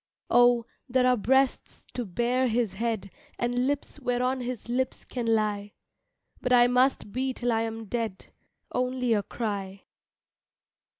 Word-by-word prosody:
Oh, 245 Hz, -1 st, +5 dB, 0.2 s
there 250 Hz, 0 st, +3 dB
are 255 Hz, 0 st, +5 dB
breasts 265 Hz, +4 st, +1 dB
to 245 Hz, -, -3 dB
bear 240 Hz, +7 st, +1 dB
his 230 Hz, -4 st, 0 dB
head, 215 Hz, -2 st, -2 dB, 0.3 s
And 245 Hz, +1 st, 0 dB
lips 285 Hz, +1 st, -3 dB
whereon 250 Hz, 0 st, 0 dB
his 245 Hz, -2 st, -5 dB
lips 255 Hz, +2 st, -2 dB
can 245 Hz, -3 st, -4 dB
lie, 210 Hz, -2 st, 0 dB, 0.7 s
But 250 Hz, -, -1 dB
I 245 Hz, -1 st, +7 dB
must 250 Hz, -3 st, +2 dB
be 260 Hz, +2 st, -1 dB
till 245 Hz, -1 st, -1 dB
I 225 Hz, -1 st, +2 dB
am 225 Hz, 0 st, -4 dB
dead 225 Hz, -3 st, -3 dB, 0.5 s
Only 250 Hz, -1 st, +1 dB
a 210 Hz, -, +2 dB
cry. 200 Hz, -3 st, -4 dB
240 Hz, 140 wpm, -27 LUFS, 225-250 Hz, 0.7 s, I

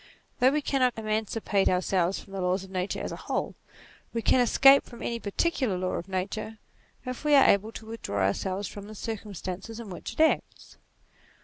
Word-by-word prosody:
Though 255 Hz, -, +6 dB
we 295 Hz, +2 st, 0 dB
cannot 255 Hz, -4 st, +1 dB
emancipate 215 Hz, -2 st, 0 dB
ourselves 185 Hz, 0 st, +1 dB
from 195 Hz, -, -14 dB
the 195 Hz, -, -3 dB
laws 180 Hz, +1 st, 0 dB
of 190 Hz, -, -12 dB
nature 185 Hz, +1 st, -2 dB
as -, -, -4 dB
a -, -, -4 dB
whole, -, -, -3 dB, 0.6 s
we 230 Hz, -, -1 dB
can 255 Hz, -, +4 dB
escape 270 Hz, +3 st, +6 dB
from 240 Hz, -, -11 dB
any 235 Hz, 0 st, -2 dB
particular 230 Hz, -, 0 dB
law 185 Hz, 0 st, -1 dB
of 175 Hz, -, -4 dB
nature, 200 Hz, +4 st, -3 dB, 0.5 s
if 255 Hz, +2 st, -5 dB
we 300 Hz, -1 st, +4 dB
are 275 Hz, -, +7 dB
able 205 Hz, +3 st, +3 dB
to 220 Hz, -, -9 dB
withdraw 100 Hz, -, -2 dB
ourselves 190 Hz, -, -1 dB
from 205 Hz, 0 st, -9 dB
the 215 Hz, -, -9 dB
circumstances 205 Hz, 0 st, -6 dB
in 220 Hz, -4 st, -8 dB
which 175 Hz, -, -7 dB
it -, -, -15 dB
acts. 320 Hz, -, 0 dB
210 Hz, 190 wpm, -28 LUFS, 190-235 Hz, 0.6 s, are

